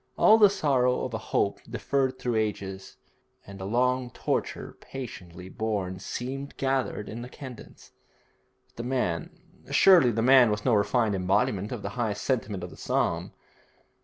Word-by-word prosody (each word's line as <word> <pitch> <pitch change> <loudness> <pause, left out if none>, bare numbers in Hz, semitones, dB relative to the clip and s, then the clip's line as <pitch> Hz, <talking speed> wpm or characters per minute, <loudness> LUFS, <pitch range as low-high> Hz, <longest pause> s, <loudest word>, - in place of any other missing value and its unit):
All 220 +1 +6
the 205 -2 +8
sorrow 135 -9 +1
of 125 - -6
a 110 - -2
hope - - +1
deferred 135 -2 -1
through 120 -2 -2
ages, 95 -3 -3 0.5
and 100 -1 -10
a - - -4
long 125 +3 +1
torture - - -3
patiently 90 -9 -8
borne, 95 -3 -3
seemed 135 +7 -6
gathered 135 -5 -1
in 115 +2 -6
the 125 - -8
cadence; 130 -3 -11 0.8
but - - -35
the 115 - -4
man 90 -11 -1 0.4
surely 180 -10 +6
the 115 -1 0
man 130 -2 +7
was 105 0 -2
no 125 - +3
refined 105 +1 +2
embodiment 95 +1 0
of 120 -5 -5
the 100 - -3
high 110 -3 0
sentiment 105 -4 -2
of 90 - -7
his - - -14
psalm! - - -1
115 Hz, 160 wpm, -27 LUFS, 100-130 Hz, 0.8 s, the